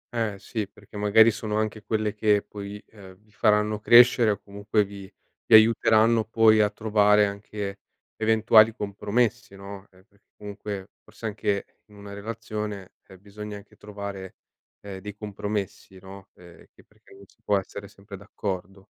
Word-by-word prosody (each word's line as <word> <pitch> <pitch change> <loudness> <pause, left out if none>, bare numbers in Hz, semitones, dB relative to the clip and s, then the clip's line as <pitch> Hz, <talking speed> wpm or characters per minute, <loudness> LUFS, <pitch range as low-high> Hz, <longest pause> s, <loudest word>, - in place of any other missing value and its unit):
Eh, 110 -4 -2
sì, 105 +1 -5
perché 105 +1 -19
magari 105 +2 +5
sono 105 0 -4
anche 110 0 -2
quelle 110 -1 -2
che 105 -1 +2
poi, 100 0 -8
ehm, 95 -4 -14
vi 105 +2 -29
faranno 105 -1 +1
crescere 120 +1 +6
o 100 -2 -1
comunque 100 +1 -1
vi 100 0 -11 0.4
vi - - +7
aiuteranno 110 0 +4
poi 110 -1 +4
a 105 - +3
trovare 105 -1 +3
anche, 100 0 -6 0.4
eventuali 110 0 +4
compromessi, 110 +1 -2
no, 100 0 -10
eh, 95 0 -23
perché 100 -2 -33
comunque, 100 -1 -7
forse, 110 +2 -13
anche 100 -2 -2 0.2
in 105 - -19
una 100 0 -11
relazione, 105 -2 -6 0.2
ehm, 95 -1 -15
bisogna 105 +1 -9
anche 100 - -16
trovare, 100 -2 -8 0.5
ehm, 100 -2 -8
dei 105 +1 -9
compromessi, 105 -2 -6
no, 95 +1 -13
ehm, 85 -1 -17
che - - -21
perché - - -23
non 100 0 -15
si - - -30
può 100 - +2
essere 100 +1 -7
sempre 100 0 -13
d'accordo. 95 0 -6
105 Hz, 160 wpm, -25 LUFS, 100-110 Hz, 0.5 s, vi